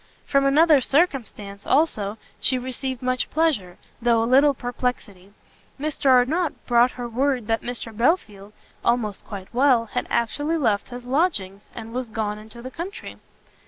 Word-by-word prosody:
From 275 -1 +2
another 300 0 +5
circumstance, 240 - -1
also, 220 -9 +1 0.2
she 260 - +1
received 260 0 -4
much 255 0 0
pleasure, 280 - 0 0.2
though 230 -1 +3
a - - +1
little 275 +4 +5
perplexity; 245 -6 -4 0.5
Mr 300 -1 -2
Arnott 285 +7 +2
brought 240 0 +4
her 245 -1 -6
word 255 0 0
that 225 +1 0
Mr 235 -2 -5
Belfield, 215 - 0 0.3
almost 225 -4 0
quite 195 -1 -9
well, 250 -2 +4
had 215 - -3
actually 290 +8 0
left 220 -9 0
his 245 0 -8
lodgings, 245 - -1
and 225 +1 -8
was 250 -1 -3
gone 210 -1 -3
into 220 +2 -11
the 255 - -7
country. 360 - -7
245 Hz, 150 wpm, -23 LUFS, 220-275 Hz, 0.5 s, another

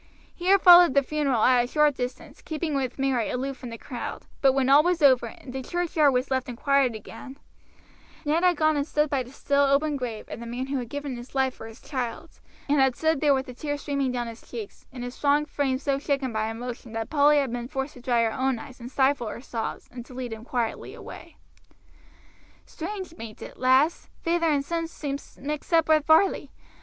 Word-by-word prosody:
He 355 - -6
had 390 0 +5
followed 350 -5 +9
the 280 - +5
funeral 275 -5 0
at 250 -1 +5
a - - -4
short 300 +2 +3
distance, 250 -1 -6
keeping 315 -1 -3
with 260 -3 -2
Mary 265 -4 0
aloof 265 +2 -3
from 250 -1 -9
the 230 - -7
crowd; 245 +1 -6 0.2
but 270 -1 +5
when 265 -1 +1
all 280 +2 +7
was 350 -1 0
over, 260 -4 +5
and 250 +3 -11
the 265 - -3
churchyard 325 -1 +1
was 255 +1 -1
left 260 0 0
in 245 - -5
quiet 275 -1 +2
again, 260 +5 -10 0.9
Luke 315 +4 +1
had 360 -3 +4
gone 310 0 +3
and 285 +1 -1
stood 300 -1 0
by 275 -2 +1
the 250 0 -9
still 280 +1 +1
open 285 +1 +2
grave 235 -5 -5
of - - -7
the 235 - -7
man 245 +2 -3
who 270 0 -2
had 240 -2 -6
given 285 -1 -4
his 240 +3 -11
life 265 -1 +2
for 225 - -10
his 225 +1 -12
child's, 260 +3 -5 0.3
and 290 0 +2
had 265 -2 +3
stood 320 0 +1
there 290 -2 +4
with 265 0 -2
the 250 - -9
tears 290 +3 -4
streaming 280 -3 -1
down 245 -1 -2
his 230 -1 -9
cheeks, 225 -4 -9
and 250 -2 -7
his 245 0 -5
strong 290 +2 +2
frame 280 -3 -1
so 275 0 -1
shaken 275 -4 -1
by 215 0 -1
emotion 235 +1 -7
that 225 0 -4
Polly 295 0 +5
had 275 -4 +1
been 240 0 -4
forced 270 +1 -4
to 250 - -13
dry 240 -2 +2
her 225 -1 0
own 260 -1 0
eyes 255 +2 -11
and 240 0 -8
stifle 265 -3 +2
her 220 - -6
sobs, 230 -3 -5
and 245 -1 -8
to 255 - -12
lead 250 -3 -4
him 220 0 -9
quietly 240 -2 -3
away. - - -11 1.3
"Strange, 370 0 -6
bain't 225 -2 -9
it, - - -11
lass; 260 +6 +3
feyther 335 -1 +1
and 285 -2 +1
son 335 +1 -2
seem 285 -4 -5 0.2
mixed 295 +4 -5
up 330 -1 +4
with 310 -1 +4
Varley. 320 +5 +4
270 Hz, 225 wpm, -26 LUFS, 245-295 Hz, 1.3 s, followed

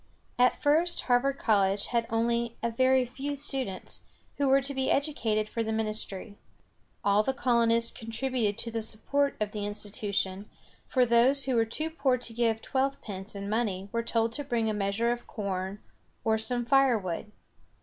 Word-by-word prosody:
At 250 0 +4
first, 320 +4 +3
Harvard 265 +2 +2
College 200 -4 +2
had 230 -1 +1
only 235 +1 0
a 235 - +1
very 260 +2 +3
few 275 +4 -4
students, 265 -8 -4 0.4
who 285 - +1
were 270 +1 +5
to 275 +1 -2
be 265 -1 0
educated 225 -7 0
for 230 - -3
the 220 - -2
ministry. 215 -2 -3 0.6
All 200 +1 +4
the 265 +5 -1
colonists 230 -2 +2
contributed 225 -2 -2
to 230 - -2
the 225 0 -2
support 280 +6 0
of 210 -1 -1
the 210 -1 -4
institution, 205 -1 -2 0.4
for 255 -2 +3
those 245 +4 +4
who 260 -2 0
were 225 -1 +3
too 310 +8 -2
poor 275 -5 +1
to 240 -2 -6
give 225 -1 0
twelvepence 225 -8 -2
in 200 0 -5
money 205 -3 -1
were 230 - 0
told 230 -1 0
to 290 +5 -4
bring 230 -5 0
a - - -2
measure 205 +3 0
of 240 0 -4
corn 195 -1 -4 0.4
or 220 0 +2
some 240 +1 0
fire 270 -2 +4
wood. 185 +1 -5
230 Hz, 170 wpm, -29 LUFS, 210-260 Hz, 0.6 s, were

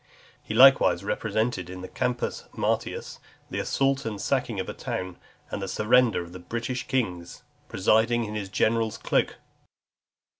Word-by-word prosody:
He 110 - -5
likewise 135 +3 +6
represented 110 -5 -1
in 90 0 -7
the 95 - -6
Campus 125 +4 -2
Martius, - - -2 0.3
the - - -2
assault 135 0 +1
and 105 -3 -4
sacking - - -1
of - - -3
a - - -4
town, 90 -1 -5 0.3
and 100 - -3
the 95 - -3
surrender 110 0 +3
of 85 - -12
the 90 - -8
British 120 +7 -4
kings, 90 -10 -2 0.3
presiding 115 +4 +2
in 105 -1 -5
his 105 -2 -4
general's 110 +2 +1
cloak. - - 0
110 Hz, 150 wpm, -26 LUFS, 95-120 Hz, 0.3 s, likewise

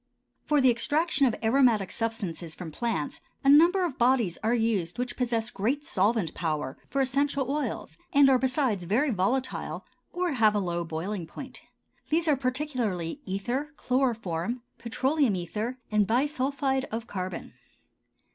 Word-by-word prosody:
For 295 -2 +3
the 260 -1 +6
extraction 290 +4 +1
of 235 - 0
aromatic 225 -4 +3
substances 200 -8 -3
from 170 -3 -7
plants 200 -5 -2 0.2
a 275 - +4
number 340 +6 +6
of 285 -6 -5
bodies 240 -7 +2
are 225 +3 +2
used 220 -7 0
which 250 0 -3
possess 235 -2 -1
great 260 +9 -1
solvent 200 -3 +1
power 150 -5 -2
for 275 - 0
essential 275 0 0
oils, 300 +3 -3
and 285 -3 +6
are 265 -2 +5
besides 255 - 0
very 250 - +2
volatile, 245 +7 -1 0.3
or 355 -1 -1
have 220 -5 +3
a - - +2
low 175 -3 -2
boiling 170 +3 -4
point. 260 +9 -9 0.5
These 325 +2 +2
are 300 - +5
particularly 255 - -2
ether, 245 +11 -2
chloroform, 235 -4 -1 0.2
petroleum 260 +1 +1
ether, 210 +8 -3
and 210 -2 +3
bisulphide 270 +1 0
of 225 -1 -5
carbon. 185 -5 -5
240 Hz, 145 wpm, -28 LUFS, 195-275 Hz, 0.5 s, the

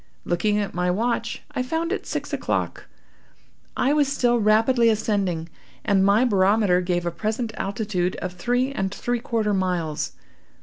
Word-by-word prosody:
Looking 205 +5 +1
at 205 -1 -2
my 180 +1 0
watch, 230 +4 -1
I - - -2
found 325 +6 -2
it 410 - -3
six - - -4
o'clock. - - -2 0.9
I 275 - +2
was 295 -2 +3
still 240 -3 +2
rapidly 225 +3 +4
ascending, 200 -6 0 0.4
and 195 -2 +3
my 205 +5 +4
barometer 200 -3 +3
gave 175 -1 -1
a 175 - 0
present 220 +6 -3
altitude 195 -3 -2
of 180 0 -5
three 245 +8 0
and 195 -8 -2
three 240 +3 -2
quarter 225 -3 -1
miles. 175 -5 -1
210 Hz, 150 wpm, -24 LUFS, 180-240 Hz, 0.9 s, rapidly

